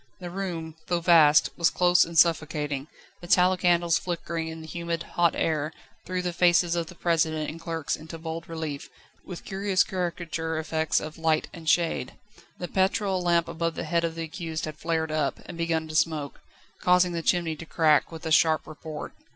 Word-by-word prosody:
The 175 -2 -7
room, 170 -4 -5
though 175 -1 +1
vast, 165 -3 +5
was 170 -2 +3
close 180 0 +4
and 165 0 -6
suffocating, 150 -4 +2 0.3
the 175 - -10
tallow 180 0 +4
candles 175 -3 +2
flickering 170 -2 -4
in 160 0 -7
the - - -9
humid, 170 +1 -4
hot 170 -1 +1
air 155 -1 0 0.4
threw 185 0 -2
the 175 -1 -2
faces 175 0 +3
of 170 -1 -2
the 180 - -11
President 160 -3 0
and 165 +1 -11
clerks 165 -3 -2
into 160 +1 -9
bold 165 +1 -6
relief, 160 -4 -5 0.3
with 180 -3 -9
curious 195 -1 +1
caricature 170 -4 -3
effects 160 0 0
of 155 +2 -8
light 160 -1 +1
and 165 -2 -4
shade. 160 -5 +1 0.4
The 175 - -5
petrol 190 +1 +1
lamp 170 -1 +2
above 165 0 -2
the - - -4
head 170 +1 0
of 165 -1 -2
the 165 - -4
accused 160 -1 -5
had 155 -1 -7
flared 160 -1 -1
up, 155 -3 -1
and 175 - -8
begun 165 -1 -1
to 155 - -7
smoke, 155 -2 0 0.4
causing 180 0 +4
the 170 -1 -2
chimney 170 -1 +1
to 160 - -8
crack 155 -2 +3
with 165 0 -9
a 160 - -2
sharp 160 0 +4
report. 155 0 -8
165 Hz, 190 wpm, -26 LUFS, 160-175 Hz, 0.4 s, vast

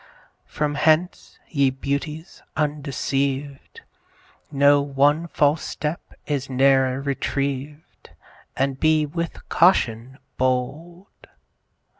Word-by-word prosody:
From 150 0 -2
hence, 160 +4 +1
ye 140 -4 +2
Beauties 140 +5 -5 0.2
undeceived, 140 - -2 0.7
Know, 145 0 +4
one 145 +4 +1
false 150 -1 +1
step 150 +3 -4 0.2
is 140 -3 -3
ne'er 135 0 +3
retrieved, 140 +1 -4 0.5
And 135 0 -1
be 155 -1 +3
with 165 +2 -5
caution 130 -8 +2 0.2
bold. 145 +9 -3
140 Hz, 85 wpm, -23 LUFS, 135-155 Hz, 0.7 s, Know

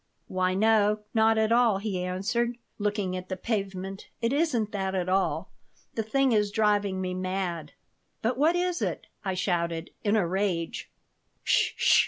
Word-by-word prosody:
"Why, 185 0 0
no. 210 0 +3
Not 220 -1 +4
at 220 0 +2
all," 235 -4 +4
he 195 -3 -2
answered, 225 +7 -1 0.2
looking 205 -3 -1
at 185 0 -6
the 185 - -3
pavement. 195 -2 -3
"It 230 +2 0
isn't 255 -9 +1
that 190 -2 -2
at 180 -1 -1
all. 190 +1 0 0.4
The 225 - -1
thing 265 +4 +2
is 210 -2 +3
driving 205 -2 +1
me 185 -1 -2
mad." 185 -4 -3 0.5
"But 235 +3 +1
what 310 +7 +3
is 355 0 0
it?" - - -2 0.2
I 190 -2 -1
shouted, 170 -2 -1
in 210 0 +2
a 210 -5 +3
rage 180 -2 -1 0.6
"'S - - -6 0.3
sh!" - - +5
205 Hz, 165 wpm, -28 LUFS, 185-225 Hz, 0.6 s, sh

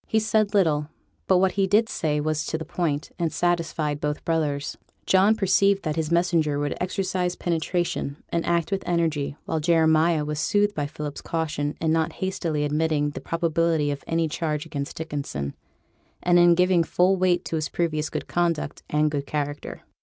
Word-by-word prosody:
He 220 - +1
said 215 -1 +1
little; 155 -6 +2 0.4
but 190 - +5
what 190 +1 +3
he 195 0 +1
did 215 +4 +3
say 150 -7 -1
was 155 +1 -1
to 160 - -1
the 160 - -6
point, 155 -3 -2
and 165 -2 0
satisfied 165 -4 -1
both 150 0 -3
brothers. 150 -3 -1 0.3
John 195 +3 +4
perceived 195 0 +3
that 155 -1 -2
his 160 -2 -1
messenger 170 -4 +2
would 145 0 -1
exercise 180 -1 -1
penetration 170 -3 -2
and 170 0 -1
act 170 0 0
with 195 -1 0
energy; 160 -5 0
while 160 - -1
Jeremiah 160 -1 +3
was 150 0 -3
soothed 205 +4 +2
by 145 -5 -2
Philip's 150 -1 -6
caution 155 -3 -2
in 160 -1 +1
not 160 0 +1
hastily 170 -5 -2
admitting 150 0 0
the - - -7
probability 165 -2 +1
of 145 - -5
any 165 0 +1
charge 155 0 -2
against 145 -3 -5
Dickinson, 140 - -4 0.7
and 175 0 +5
in 175 0 +6
giving 180 -1 +3
full 180 +3 +2
weight 180 -1 +1
to - - -3
his 155 -1 -2
previous 155 -3 -1
good - - -4
conduct 170 -4 -1
and 150 0 +2
good 140 -2 -3
character. 145 -1 -4
160 Hz, 175 wpm, -25 LUFS, 150-175 Hz, 0.7 s, in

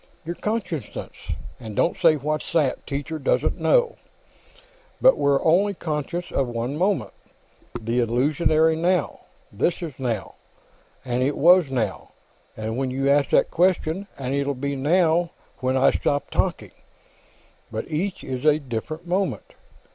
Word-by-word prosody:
"Your 170 - -3
consciousness. 185 - -4 0.5
And 110 -4 -8
don't 170 - +2
say, 165 -3 +4
'What's 150 +1 -3
that?' 150 -6 +1
Teacher 145 +3 -4
doesn't 140 - 0
know. 485 -1 +3 1.0
But - - +6
we're 140 -1 +1
only 195 +5 +3
conscious 160 +2 -4
of 135 - 0
one 120 +3 -3
moment; 190 +5 0 0.7
the 115 +2 -1
illusory 155 +7 +2
now. 170 -2 0 0.3
This 150 - -1
is 160 -4 -5
'now,' 115 -7 -3 0.7
and 125 0 -1
it 140 +3 0
was 175 -2 +5
'now' 125 -4 -2 0.5
when 110 +5 -2
you 135 +2 0
asked 140 -1 +3
that - - +3
question, 180 +1 +1
and 130 -1 -3
it'll 140 0 0
be 140 +2 -3
'now' 165 +4 +2 0.3
when 130 0 0
I 130 - +5
stop 145 0 -1
talking, - - -1 1.0
but - - -4
each 185 +5 -3
is 130 -1 -5
a 150 -1 +5
different 150 +5 -5
moment. 185 +3 -2
150 Hz, 140 wpm, -24 LUFS, 130-170 Hz, 1.0 s, But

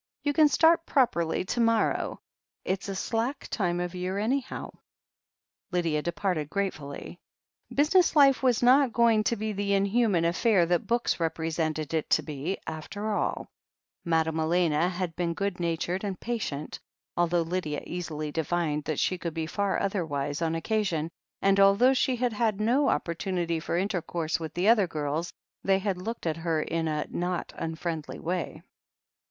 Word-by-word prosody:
You 290 - +1
can 305 +1 +6
start 325 +3 +4
properly 180 - +1
to 240 - -2
morrow. 230 -1 +1 0.4
It's 195 +2 -2
a 195 - -3
slack 230 +7 -2
time 175 -5 0
of 175 0 -3
year, 185 +1 -3
anyhow." 250 +6 -2 1.0
Lydia 165 -4 0
departed 170 -2 -2
gratefully. 175 -4 -4 0.5
Business 320 +4 +3
life 275 -5 +6
was 250 -3 +2
not 255 0 +5
going 230 -2 +4
to 235 - +2
be 215 0 -3
the 200 0 -1
inhuman 200 -3 +2
affair 180 +2 +3
that 175 0 0
books 235 -4 +1
represented 160 -1 -2
it 160 -2 -1
to - - +3
be, 155 +5 -3
after 205 +7 -4
all; 205 - -2 0.5
Madame 160 -1 +1
Elena 165 0 +2
had 180 -2 -3
been 170 -1 -1
good 200 -1 -2
natured 170 +2 -1
and 195 -3 -3
patient, 215 -11 -4 0.4
although 175 0 +2
Lydia 165 -3 -3
easily 155 -4 -4
divined 160 -1 -1
that 155 - -2
she 185 - 0
could 170 -2 -4
be 160 -1 -1
far 200 +4 -1
otherwise 150 -7 -2
on 165 -1 0
occa 215 +6 0
sion, 165 -4 -2 0.3
and 195 0 +4
although 200 +7 +6
she 260 0 +1
had 245 -1 0
had 215 -2 0
no 250 +7 +3
opportunity 170 -1 -1
for 170 +1 -2
intercourse 175 -4 -1
with 160 -1 -6
the 180 +3 +1
other 215 -4 +5
girls, 155 +1 -2 0.3
they 195 0 +3
had 195 -2 -2
looked 230 +2 -5
at 160 -1 0
her 165 -1 0
in 165 0 -2
a 150 -1 -1
not 175 0 -2
unfriendly 160 -1 -4
way. 170 -2 -4
180 Hz, 160 wpm, -28 LUFS, 165-215 Hz, 1.0 s, can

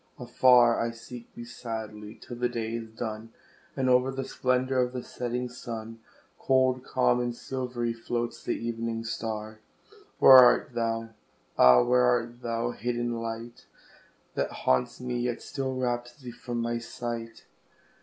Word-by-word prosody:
Afar 125 -1 +5
I 115 - 0
seek 115 +1 -10
thee 120 - -8
sadly, 110 -3 -7
till 120 - -9
the 125 0 0
day 115 -2 -3
is 115 -1 -5
done, 110 0 -6 0.5
And 130 - +1
o'er 125 +1 +4
the 135 0 -4
splendour 130 +1 0
of 125 0 +1
the 125 -1 -4
setting 125 0 -3
sun, 115 -2 -7 0.4
Cold, 130 -1 +2
calm, 125 -2 +2
and 120 -1 -2
silvery, 125 -2 -3
floats 120 +1 -4
the - - -1
evening 115 -1 -3
star; 110 -1 -5 0.6
Where 130 - +9
art 125 0 +5
thou? 115 -1 -1 0.5
Ah! 65 - +7
where 125 +1 +3
art 120 0 0
thou, 115 0 -2
hid 120 +1 -3
in 120 -1 -2
light 115 +1 -7 0.7
That - - -1 0.2
haunts 65 - +1
me, 125 -1 -3
yet 120 -1 -1
still 135 -2 -3
wraps 120 -1 -2
thee 125 -4 -9
from 120 0 -5
my 120 0 -1
sight? 115 -1 -6
120 Hz, 155 wpm, -28 LUFS, 115-125 Hz, 0.7 s, Where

